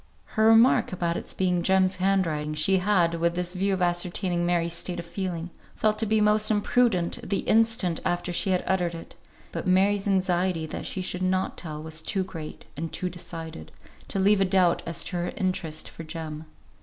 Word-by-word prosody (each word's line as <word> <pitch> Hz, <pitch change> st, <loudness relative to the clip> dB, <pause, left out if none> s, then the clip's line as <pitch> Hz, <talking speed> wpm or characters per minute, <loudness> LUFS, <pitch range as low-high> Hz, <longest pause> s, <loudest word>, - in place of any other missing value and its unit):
Her 220 Hz, 0 st, +3 dB
remark 225 Hz, +3 st, +5 dB
about 170 Hz, -2 st, -1 dB
its -, -, -5 dB
being 180 Hz, -2 st, +1 dB
Jem's 190 Hz, +1 st, +2 dB
hand 190 Hz, 0 st, +2 dB
writing, 150 Hz, -1 st, -3 dB
she 190 Hz, +5 st, +2 dB
had, 180 Hz, -3 st, +2 dB
with 170 Hz, +1 st, +1 dB
this 180 Hz, 0 st, -3 dB
view 195 Hz, +2 st, 0 dB
of 185 Hz, -, -1 dB
ascertaining 175 Hz, 0 st, 0 dB
Mary's 170 Hz, -1 st, +1 dB
state 175 Hz, +1 st, -2 dB
of 170 Hz, -, -6 dB
feeling, 175 Hz, -1 st, -4 dB, 0.2 s
felt 215 Hz, -1 st, +1 dB
to 220 Hz, -, +1 dB
be 220 Hz, +1 st, +2 dB
most 210 Hz, 0 st, +4 dB
imprudent 210 Hz, -4 st, +2 dB
the 200 Hz, -, -2 dB
instant 225 Hz, -6 st, +2 dB
after 175 Hz, 0 st, -1 dB
she 190 Hz, +3 st, +1 dB
uttered 180 Hz, -1 st, 0 dB
it; 165 Hz, -, -10 dB, 0.4 s
but -, -, -4 dB
Mary's 195 Hz, +2 st, +3 dB
anxiety 185 Hz, -3 st, +1 dB
that 155 Hz, -, -6 dB
she 190 Hz, -, -3 dB
should 180 Hz, 0 st, -2 dB
not 185 Hz, 0 st, 0 dB
tell 155 Hz, -3 st, -6 dB
was 160 Hz, 0 st, -2 dB
too 190 Hz, +4 st, -1 dB
great, 165 Hz, -5 st, -8 dB
and 160 Hz, +2 st, -4 dB
too 180 Hz, -, -3 dB
decided, 165 Hz, -, -8 dB, 0.4 s
to -, -, -4 dB
leave 195 Hz, +1 st, +4 dB
a -, -, +4 dB
doubt 185 Hz, -2 st, +3 dB
as 170 Hz, -, 0 dB
to 180 Hz, -, -4 dB
her 175 Hz, 0 st, -2 dB
interest 180 Hz, -5 st, -2 dB
for 165 Hz, -, -9 dB
Jem. 160 Hz, -1 st, -7 dB
180 Hz, 195 wpm, -26 LUFS, 170-195 Hz, 0.4 s, remark